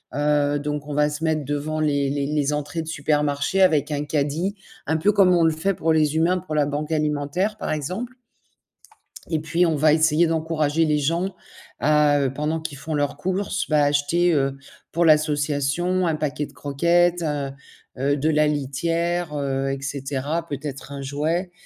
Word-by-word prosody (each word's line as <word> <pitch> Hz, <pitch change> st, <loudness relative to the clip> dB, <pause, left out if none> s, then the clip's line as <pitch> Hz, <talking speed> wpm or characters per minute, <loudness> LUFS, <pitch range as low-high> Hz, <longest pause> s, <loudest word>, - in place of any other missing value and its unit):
Heu, 145 Hz, 0 st, +2 dB
donc 150 Hz, 0 st, -4 dB
on 150 Hz, -, -5 dB
va 150 Hz, 0 st, +3 dB
se 150 Hz, +2 st, -5 dB
mettre 155 Hz, -2 st, 0 dB
devant 145 Hz, +2 st, -2 dB
les 145 Hz, -2 st, +1 dB
les 140 Hz, 0 st, -1 dB
les 150 Hz, -1 st, 0 dB
entrées 150 Hz, +3 st, -3 dB
de 160 Hz, -, -12 dB
supermarchés 150 Hz, +4 st, 0 dB
avec 155 Hz, -5 st, +3 dB
un 145 Hz, 0 st, -1 dB
caddie, 155 Hz, +6 st, -1 dB, 0.3 s
un 160 Hz, +1 st, +1 dB
peu 200 Hz, +6 st, +3 dB
comme 190 Hz, -2 st, +5 dB
on 170 Hz, -, +3 dB
le 160 Hz, -, +4 dB
fait 180 Hz, +6 st, 0 dB
pour 160 Hz, -1 st, +1 dB
les 155 Hz, -1 st, +2 dB
humains, 175 Hz, +3 st, +2 dB
pour 165 Hz, -3 st, -6 dB
la 150 Hz, -1 st, +3 dB
banque 145 Hz, +2 st, -3 dB
alimentaire 150 Hz, +7 st, -1 dB
par -, -, -3 dB
exemple 185 Hz, -, -4 dB, 1.2 s
et 160 Hz, -, +1 dB
puis 160 Hz, +3 st, +1 dB
on 165 Hz, -2 st, +1 dB
va 155 Hz, +1 st, +4 dB
essayer 160 Hz, +1 st, +3 dB
d'encourager 160 Hz, -1 st, 0 dB
les 150 Hz, -1 st, +2 dB
gens 170 Hz, +6 st, -1 dB, 0.4 s
à, 150 Hz, -1 st, +3 dB
heu, 135 Hz, -1 st, 0 dB
pendant 155 Hz, +3 st, -2 dB
qu'ils 160 Hz, -3 st, -6 dB
font 155 Hz, +2 st, -4 dB
leurs 145 Hz, -2 st, 0 dB
courses, 190 Hz, +5 st, -2 dB
bah, 150 Hz, -2 st, +3 dB
à -, -, +4 dB
acheter, 155 Hz, +5 st, +2 dB
heu, 135 Hz, -2 st, 0 dB, 0.3 s
pour 170 Hz, +1 st, +1 dB
l'association, 155 Hz, +3 st, +2 dB
un 160 Hz, -, +1 dB
paquet 150 Hz, -1 st, -2 dB
de -, -, -19 dB
croquettes, 170 Hz, +5 st, +2 dB
heu 145 Hz, -3 st, -2 dB, 0.5 s
heu, 145 Hz, +2 st, +1 dB
de 150 Hz, +3 st, 0 dB
la 150 Hz, -1 st, +3 dB
litière, 165 Hz, +4 st, -1 dB
heu 135 Hz, -1 st, -1 dB
et 135 Hz, -, -3 dB
cetera, 140 Hz, +4 st, -3 dB
peut-être 140 Hz, -1 st, -6 dB
un 140 Hz, -, -6 dB
jouet. 155 Hz, +6 st, -2 dB
150 Hz, 185 wpm, -23 LUFS, 145-165 Hz, 1.2 s, comme